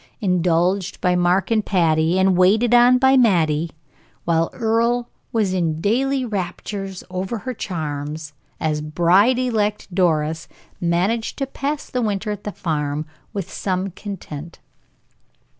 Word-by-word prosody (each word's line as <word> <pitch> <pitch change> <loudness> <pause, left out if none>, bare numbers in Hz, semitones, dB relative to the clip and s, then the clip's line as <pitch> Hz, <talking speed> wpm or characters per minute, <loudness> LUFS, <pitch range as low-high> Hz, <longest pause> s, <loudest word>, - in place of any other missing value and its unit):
Indulged 180 -1 +1
by 180 0 +2
Mark 180 +4 +2
and 220 -2 +3
Patty, 165 -3 +2
and 190 0 +3
waited 215 +7 +4
on 245 +1 +7
by 265 +1 +4
Mattie, 170 - +3 0.6
while 165 -1 +2
Earle 235 +1 +1 0.2
was 210 -5 +1
in 165 -4 0
daily 260 +7 +1
raptures 195 -1 -4
over 190 +5 -3
her 255 +4 -5
charms, 150 -5 -5 0.3
as 155 -1 -1
bride 175 +10 +3
elect 215 -6 -1
Doris 160 -3 +1 0.3
managed 180 +7 0
to 275 - -1
pass 280 +2 -4
the 250 - -2
winter 210 -1 -1
at 205 0 -6
the 210 - -3
farm 150 -4 -2 0.3
with 195 -3 -5
some 190 0 -2
content. 170 -5 -8
190 Hz, 130 wpm, -21 LUFS, 165-225 Hz, 0.6 s, on